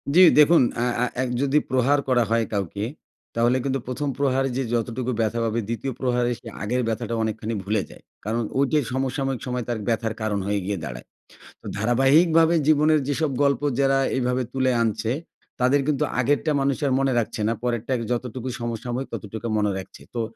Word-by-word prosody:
জি। 185 - +8 0.2
দেখুন, 160 +3 +7 0.2
আ - - +2 0.2
আ - - +3 0.2
১ 125 - -2
যদি 140 +1 +2
প্রহার 130 +3 +3
করা 125 -2 +3
হয় 115 -1 +2
কাউকে, 100 0 -2 0.5
তাহলে 120 +2 +3
কিন্তু 135 -1 -1
১ম 140 +3 -2
প্রহারে 135 -1 +1
যে 135 - 0
যতটুকু 120 +2 -1
ব্যথা 115 +2 0
পাবে, 115 +1 0
২য় 115 +3 -3
প্রহারে 125 -1 +1
সে - - -13 0.2
আগের 125 +4 0
ব্যথাটা 115 +1 -2
অনেকখানি 110 +1 -3
ভুলে 105 +1 0
যায়। - - -15 0.2
কারণ 115 +2 0 0.2
ঐটা 145 +2 +3
সমসাময়িক 135 0 -1
সময় 125 -1 -2
তার 115 -2 -1
ব্যথার 115 -1 0
কারণ 105 -2 0
হয়ে 100 0 +1
গিয়ে 100 0 -1
দাঁড়ায়। - - -7 0.6
তো - - -13
ধারাবাহিকভাবে 155 +8 +4
জীবনের 155 0 +4
যেসব 145 +1 0
গল্প 140 -2 +2 0.2
যারা 135 0 +3 0.2
এইভাবে 125 0 0
তুলে 130 -1 +1
আনছে, 110 0 -1 0.5
তাদের 135 +3 +4
কিন্তু 145 -3 +1 0.2
আগেরটা 145 +4 +1
মানুষ 135 -1 +1
আর 135 - +1
মনে 135 -1 +2
রাখছে 115 -1 -2
না। - - +2
পরেরটা 120 0 -2 0.2
যতটুকু 125 +1 -3
সমসাময়িক 120 +3 -3
ততটুকু 110 +2 -5
মনে 105 -1 +1
রাখছে। 95 - -10
তো 120 - -1
125 Hz, 175 wpm, -24 LUFS, 115-135 Hz, 0.6 s, জি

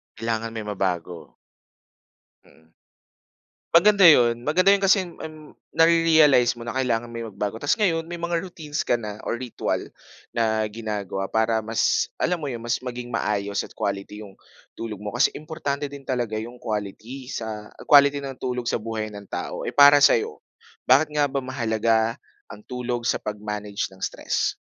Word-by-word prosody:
Kailangan 115 0 -2
may 110 - -4
mabago. 90 -4 -3 1.1
Mm. 80 0 -24 1.0
Maganda 200 +3 +6
'yon. 120 -6 +6
Maganda 185 +6 +3
'yon 200 - -4
kasi, 195 -1 +4
um, 155 -2 -11 0.2
nare-realize 160 -6 +5
mo 120 - -11
na 120 - -4
kailangan 120 -3 0
mo 115 - -8
'yung 115 -1 -5
magbago. 105 +2 -3
Tas 145 +5 +1
ngayon 165 -6 +1
may 170 +1 -7
mga 170 0 -1
routines 155 -5 -5
ka - - +2
na 105 -2 -6
o - - -1
ritwal 120 -1 -3 0.5
na 110 -1 +1
ginagawa 105 -3 -4
para 110 0 +1
mas, 110 0 +1
alam 180 0 +1
mo 150 -3 -5
'yon, 115 -2 -6
mas 120 +1 -1
maging 125 -1 -6
maayos 100 -3 -1
at - - -15
quality 100 +1 -4
'yong 100 -2 -12 0.4
tulog 110 -3 -6
mo. 105 - -4
Kasi 120 - +3
importante 150 -2 -4
din 140 -1 -11
talaga 120 -5 -2
'yong 120 +3 -7
quality 110 +4 -5
sa 110 -2 -6 0.2
quality 140 0 +7
ng 135 -1 -6
tulog 125 -2 -3
sa - - +1
buhay 110 -1 -4
ng 100 -1 -10
tao. - - -5
Eh, - - -4
para 145 0 +8
sa'yo, 440 - +3 0.5
bakit 155 -1 +5
nga 150 -1 +2
ba 140 0 -2
mahalaga 115 -3 0 0.3
ang 105 - -11
tulog 125 -1 -4
sa - - +1
pag-manage 105 -1 -4
ng 95 - -16
stress? - - -1
120 Hz, 165 wpm, -24 LUFS, 110-145 Hz, 1.1 s, para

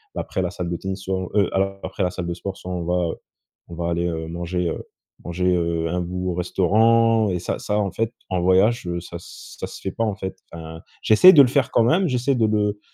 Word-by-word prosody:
bah - - -1
après 95 - -3
la 90 - -2
salle 90 -1 -4
de 85 - -2
tennis 95 +2 -5
sur 95 -1 -3
heu 100 -3 +3
a 95 0 0
après 100 - -3
la 90 - 0
salle 90 -2 -5
de 85 - -2
sport 95 +2 -6
soit 90 - -8
on 90 -1 -3
va, 90 -1 0
heu, - - -4 0.5
on 85 - -9
va 85 0 -2
aller, 85 0 0
heu, 80 -1 -4
manger, 85 +1 -3
heu, - - -5 0.4
manger, 90 +1 0
heu, 85 -1 -1
un 90 +2 -1
bout 90 +1 -3
au - - -2
restaurant 110 +5 +3
et 90 - -1
ça 85 - -3
ça 105 - -1
en 100 -2 -1
fait 115 0 -1 0.2
en 90 -2 0
voyage 95 +3 +3
ça 85 0 -8
se - - -12
ça - - -4
se - - -10
fait 95 - -4
pas 115 - -2
en 105 -3 -1
fait, 95 -2 -5 0.2
enfin, 80 0 -9 0.2
j'essaie 145 +13 +8
de 145 - +9
le - - +3
faire 135 0 +1
quand 115 - +4
même, 175 +11 +3
j'essaie 130 0 +1
de 115 -3 +2
le 105 -1 0
95 Hz, 255 wpm, -22 LUFS, 85-105 Hz, 0.5 s, de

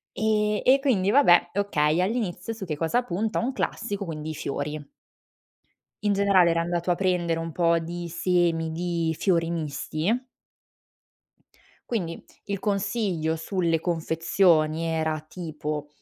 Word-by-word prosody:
E 210 -1 +1
e 265 +2 +6
quindi 225 -9 +1
vabbè, 175 -10 +5
okay, 165 -5 +2
all'inizio 200 0 -2
su 220 -3 -7
che 155 -4 -3
cosa 170 +11 +1
punta, 215 +2 -1
un 245 +3 -1
classico: 205 -6 -3
quindi, 155 -1 -5
i - - -5
fiori. 145 0 -4 1.2
In 205 - +2
generale, 195 -3 +4
era 165 0 +1
andato 175 +1 -1
a - - +2
prendere 175 -3 0
un 165 0 -4
po' 170 0 +2
di 170 +1 -5
semi 170 -1 +1
di 165 -1 -1
fiori 170 -4 +1
misti. 165 - -2 1.6
Quindi, 175 -8 -3 0.3
il 200 -1 -2
consiglio 200 -5 -1
sulle 165 -1 0
confezioni 165 -1 +2
era 160 -1 -1
tipo, 155 -3 -5
175 Hz, 130 wpm, -26 LUFS, 160-200 Hz, 1.6 s, e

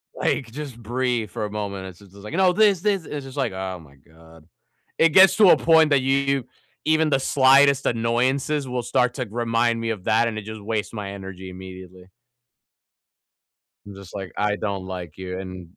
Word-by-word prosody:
Like, 120 -5 -1
just 135 -4 -8
breathe 120 -2 -2
for 105 - -4
a - - -5
moment. 100 -2 -5
It's 90 0 -12
just 100 -2 -18
is 100 - -13
like, 105 - -8
"You 165 - -3
know, 185 -1 +4
this, 205 -4 +3
this!" 195 -5 0
It's 145 -2 -6
just 135 +2 -11
like, 135 -8 -1
"Oh 95 -1 -5
my 70 -3 -17
god." 80 +2 -19 0.5
It 165 - +5
gets 190 +3 +6
to 205 -4 +7
a - - +7
point 160 -2 +4
that 140 -2 +3
you 135 -1 +1 0.4
even 155 0 +2
the 135 - +2
slightest 135 +1 +4
annoyances 130 +5 0
will 125 -1 -2
start 125 0 +1
to 125 -3 -3
g - - -15
remind 115 0 0
me 115 0 -3
of 100 -4 -6
that, 115 +2 +3
and 110 -2 -4
it 110 - -5
just 110 0 -8
wastes 105 0 -3
my 100 -3 -5
energy 95 -1 -9
immediately. 95 0 -12 1.8
I'm 100 -1 -11
just 100 -1 -12
like, 95 -2 -6
"I 105 0 +1
don't 100 -3 -4
like 90 -4 -7
you, 95 0 -6
and" 90 -2 -8
115 Hz, 205 wpm, -23 LUFS, 95-135 Hz, 1.8 s, to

